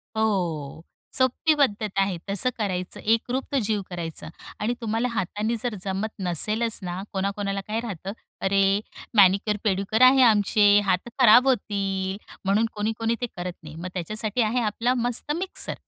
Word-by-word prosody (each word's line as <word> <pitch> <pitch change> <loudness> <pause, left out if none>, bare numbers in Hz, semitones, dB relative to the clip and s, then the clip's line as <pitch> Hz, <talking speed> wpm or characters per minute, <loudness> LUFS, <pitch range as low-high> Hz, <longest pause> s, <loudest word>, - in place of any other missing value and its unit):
हो, 170 -9 -1 0.3
सोपी 260 +5 +3
पद्धत 215 -7 +1
आहे. 195 -2 +1
तसं 200 +6 0
करायचं, 185 -4 -3
एकरूप 235 +4 0
तो 280 - +2
जीव 210 -1 0
करायचं. 165 -3 -6 0.3
आणि 215 +4 0
तुम्हाला 225 +2 0
हातानी 210 +2 -2
जर 240 -3 -2
जमत 195 +2 -2
नसेलच 210 +6 0
ना, 180 +1 -4
कोणा-कोणाला 195 0 -2
काय 220 +2 -1
राहतं, 195 -5 -5 0.3
"अरे! 195 +1 +3 0.4
मॅनिक्युअर-पेडिक्युअर 200 +2 +3
आहे 265 0 +4
आमचे, 205 -2 +5
हात 190 +4 0
खराब 250 +1 +7
होतील" 195 -5 -1 0.3
म्हणून 200 +4 +3
कोणी-कोणी 225 +2 -1
ते - - +1
करत 175 0 -5
नाही. 155 0 -10
मग 170 +3 -6
त्याच्यासाठी 215 +6 -2
आहे 230 +3 +1
आपला 230 +3 0
मस्त 245 +4 -2
मिक्सर; 375 +2 -1
210 Hz, 145 wpm, -25 LUFS, 190-230 Hz, 0.4 s, खराब